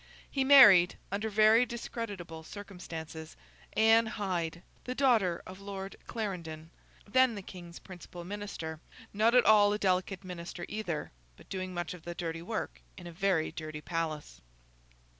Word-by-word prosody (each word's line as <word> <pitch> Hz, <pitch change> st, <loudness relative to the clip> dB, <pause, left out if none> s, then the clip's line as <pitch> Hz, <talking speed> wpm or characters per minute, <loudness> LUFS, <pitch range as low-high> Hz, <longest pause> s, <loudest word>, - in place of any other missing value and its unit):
He 270 Hz, -, +1 dB
married, 210 Hz, -11 st, +8 dB
under 205 Hz, +3 st, -2 dB
very 215 Hz, +3 st, +5 dB
discreditable 205 Hz, -8 st, -6 dB
circumstances, 165 Hz, -4 st, -9 dB, 0.4 s
Anne 225 Hz, +1 st, +5 dB
Hyde, 180 Hz, -5 st, -3 dB, 0.2 s
the 255 Hz, -, -4 dB
daughter 225 Hz, -11 st, +2 dB
of 185 Hz, +1 st, -10 dB
Lord 195 Hz, -1 st, -6 dB
Clarendon, 170 Hz, -7 st, -5 dB, 0.4 s
then 255 Hz, +2 st, +4 dB
the 200 Hz, -, -7 dB
King's 175 Hz, -2 st, -10 dB
principal 175 Hz, -2 st, -10 dB
Minister—not 205 Hz, +3 st, -3 dB
at 250 Hz, -, +6 dB
all 205 Hz, -1 st, +6 dB
a -, -, 0 dB
delicate 190 Hz, -1 st, 0 dB
minister 175 Hz, -1 st, -7 dB
either, 190 Hz, -8 st, -4 dB, 0.3 s
but -, -, -18 dB
doing 185 Hz, -1 st, -4 dB
much 175 Hz, -2 st, -4 dB
of 180 Hz, -, -11 dB
the 175 Hz, +1 st, -7 dB
dirty 165 Hz, -1 st, -4 dB
work 215 Hz, +6 st, -5 dB, 0.2 s
of 180 Hz, -, -10 dB
a 175 Hz, -, -7 dB
very 180 Hz, -2 st, 0 dB
dirty 155 Hz, -1 st, -7 dB
palace. 160 Hz, -2 st, -4 dB
185 Hz, 140 wpm, -31 LUFS, 170-215 Hz, 0.4 s, married